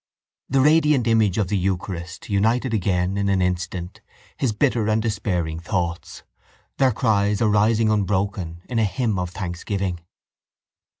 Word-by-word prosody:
The 135 0 +3
radiant 150 -3 +4
image 110 -4 +2
of 105 -4 +1
the 105 - +1
eucharist 90 -1 -4
united 115 +5 +1
again 95 -2 0
in 100 0 0
an 95 -1 +2
instant 90 +2 -3 0.3
his 130 -5 0
bitter 115 0 +1
and 110 +1 +2
despairing 90 -7 -2
thoughts, 85 0 -3 0.6
their 135 -1 +4
cries 105 -2 +1
arising 110 0 +3
unbroken 95 -4 -1
in 120 -2 -1
a - - +3
hymn 105 +1 -1
of 90 -1 -2
thanksgiving. 90 +1 -3
100 Hz, 135 wpm, -22 LUFS, 90-110 Hz, 0.6 s, radiant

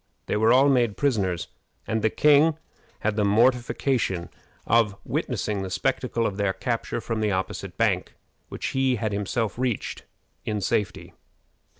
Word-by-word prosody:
They - - -1
were 110 +2 +4
all 130 +3 +6
made 120 -6 +2
prisoners, 100 -11 0 0.4
and 110 0 -1
the 110 - +3
king 150 +5 +4 0.4
had 110 0 0
the 105 - +1
mortification 120 -3 +1 0.4
of 110 -3 +3
witnessing 105 -2 -2
the 95 - -4
spectacle 125 +2 -1
of 100 - -2
their 100 -2 +1
capture 115 +4 -2
from 115 -1 -3
the 105 -1 +1
opposite 95 0 -3
bank, - - 0 0.3
which - - -4
he 135 -1 +1
had 110 -2 -2
himself 105 +3 -2
reached 125 -4 -2 0.4
in 105 -1 -2
safety. 95 -3 -2
110 Hz, 150 wpm, -25 LUFS, 100-125 Hz, 0.4 s, all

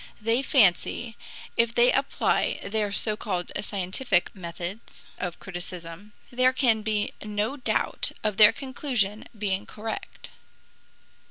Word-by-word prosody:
They 230 +3 +1
fancy 230 - +2 0.4
if 230 0 +2
they 240 +1 +6
apply 275 +1 +1
their 210 -1 -1
so 210 +1 0
called 180 -4 -3
scientific 190 +1 0
methods 175 +3 -7
of 180 -2 -4
criticism, 175 +2 -7 0.2
there 255 +1 +3
can 235 -5 +3
be 210 -1 -1
no 210 +4 -1
doubt 270 - 0
of 210 -2 0
their 210 -1 +9
conclusion 255 -6 -2
being 200 -1 -2
correct. 220 +1 -7
210 Hz, 115 wpm, -26 LUFS, 190-235 Hz, 0.4 s, their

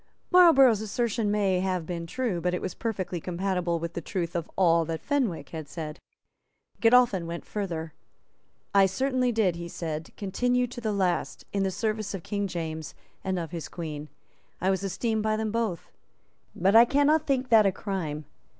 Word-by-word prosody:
Marlborough's 275 - +7
assertion 220 0 -1
may 200 -3 +2
have 185 -3 -1
been 170 -1 -5
true; 225 -4 -2
but 180 +1 0
it - - -2
was 185 - -4
perfectly 185 -6 -3
compatible 180 -1 -1
with 170 +1 -5
the 170 - -4
truth 175 0 -3
of 170 -2 -2
all 170 -3 +4
that 160 0 -3
Fenwick 245 - -1
had 160 -3 -7
said. 155 -2 -6 0.8
Godolphin 230 -7 +4
went 170 0 -6
further. 165 -6 -4 0.8
"I 195 -1 +6
certainly 255 +5 0
did," 205 -7 +1
he 170 0 -6
said, 160 -2 -5
"continue 245 +5 +1
to 245 0 -8
the 220 -2 -1
last 180 -8 -1
in 200 - +1
the 195 - +1
service 215 +1 -2
of 180 - -7
King 205 -1 -2
James 160 -4 -5 0.3
and 190 -1 -1
of 165 -3 -4
his 170 -2 -5
Queen. 155 -3 -6 0.5
I 190 +2 +2
was 190 - 0
esteemed 220 +3 -1
by 215 0 +1
them 220 -1 -2
both. 220 -7 -2 0.6
But 195 +4 +2
I 230 - +10
cannot 290 +5 +3
think 260 -2 0
that 220 -3 +6
a - - +3
crime. 170 -7 -4
190 Hz, 175 wpm, -27 LUFS, 170-225 Hz, 0.8 s, I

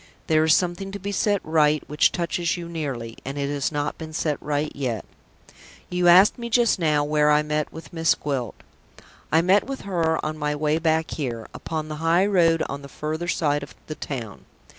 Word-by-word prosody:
"There 155 -1 +3
is 160 0 +5
something 180 +2 -1
to 200 - -5
be 200 +1 -4
set 205 0 +1
right 155 -1 +3
which 150 +1 +3
touches 170 0 -1
you 170 -1 -6
nearly; 135 -9 -5
and 135 +2 -5
it 140 0 -1
has 145 0 -1
not 145 0 -3
been 160 -1 -7
set 155 -2 -1
right 150 +1 -1
yet. 125 -7 -3 0.9
You 180 0 +2
asked 185 +7 +7
me 235 0 -5
just 235 -3 +3
now 150 -3 +2
where 150 0 +2
I 150 0 +4
met 150 0 -2
with 160 - -11
Miss 165 -1 +2
Gwilt. 135 -6 -3 0.8
I 160 +1 +4
met 190 +3 +4
with 275 -1 -5
her 165 -4 0
on 155 0 -3
my 150 0 -1
way 150 +1 +1
back 160 0 +1
here, 120 -7 -4
upon 155 -1 -4
the 155 0 -5
high 170 +3 +3
road 170 -5 +3
on 140 0 -5
the 140 - -11
further 155 +4 -4
side 145 -4 +1
of 140 - -10
the 155 - -5
town. 120 -9 -7
155 Hz, 205 wpm, -24 LUFS, 145-175 Hz, 0.9 s, asked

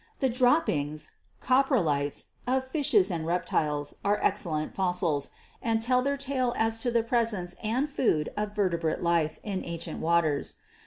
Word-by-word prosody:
The 265 - +1
droppings 235 - +1 0.3
(coprolites) 205 - +1 0.2
of 260 +1 +1
fishes 245 - +2
and 165 -2 -2
rep 175 +2 -1
tiles 150 -1 -1
are 205 +1 +2
excellent 155 -4 0
fossils, 180 -6 0 0.3
and 225 -1 +1
tell 250 +3 +2
their 280 +2 0
tale 260 -3 -1
as 225 0 +2
to 245 - +1
the 235 -1 +2
presence 225 -7 0
and 240 +7 0
food 195 - 0
of 210 0 -3
vertebrate 170 -6 0
life 170 -2 +1
in 195 -3 -3
ancient 170 -1 -5
waters. 160 -3 +1
205 Hz, 150 wpm, -28 LUFS, 165-245 Hz, 0.3 s, fishes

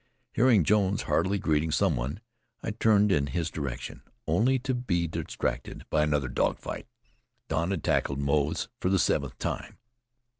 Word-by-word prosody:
Hearing 115 -6 +5
Jones 100 +2 +2
heartily 100 +1 +1
greeting 80 -3 +1
some - - +2
one, 65 - -3 0.4
I - - -2
turned 105 -2 +3
in 70 -6 +2
his 80 +4 -2
direction, 70 -5 -5 0.2
only 130 +5 +3
to 130 +1 -2
be 95 -9 0
distracted - - -4
by 75 - +3
another 75 -3 +1
dog 65 - 0
fight. - - -7 0.6
Don 80 +2 0
had 95 -6 -2
tackled 70 - +1
Moze 70 +6 0
for 90 - 0
the 95 - +3
seventh - - 0
time. - - -4
85 Hz, 155 wpm, -28 LUFS, 75-105 Hz, 0.6 s, Hearing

